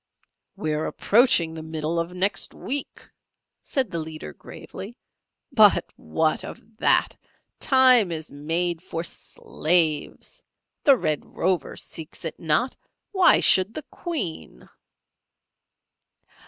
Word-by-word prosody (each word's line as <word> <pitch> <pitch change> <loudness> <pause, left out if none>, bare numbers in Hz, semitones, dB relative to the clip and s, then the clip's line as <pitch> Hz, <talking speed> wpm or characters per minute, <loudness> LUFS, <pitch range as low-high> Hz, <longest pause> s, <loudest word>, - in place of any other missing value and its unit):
"We 155 -1 -2
are 150 +1 -2
approaching 205 -8 +3
the 160 - -7
Middle 160 +1 -3
of 165 +1 -3
Next 185 +3 0
Week," 280 +1 -5 0.5
said 260 -8 -2
the 170 - -2
leader, 155 - -7
gravely; - - -10 0.5
"but - - +4
what 155 - -1
of 225 0 -11
that? - - +2 0.4
Time 255 - +5
is 160 -1 -5
made 165 +4 -2
for 165 -2 -5
slaves! 160 -2 -1 0.4
The 275 -3 +6
Red 155 -9 -1
Rover 185 0 -2
seeks 160 +1 -5
it 160 - -5
not! 165 +11 0 0.4
Why 380 -3 +5
should 190 +4 +4
the 305 - -6
Queen?" 175 - -5
170 Hz, 115 wpm, -24 LUFS, 155-225 Hz, 0.5 s, The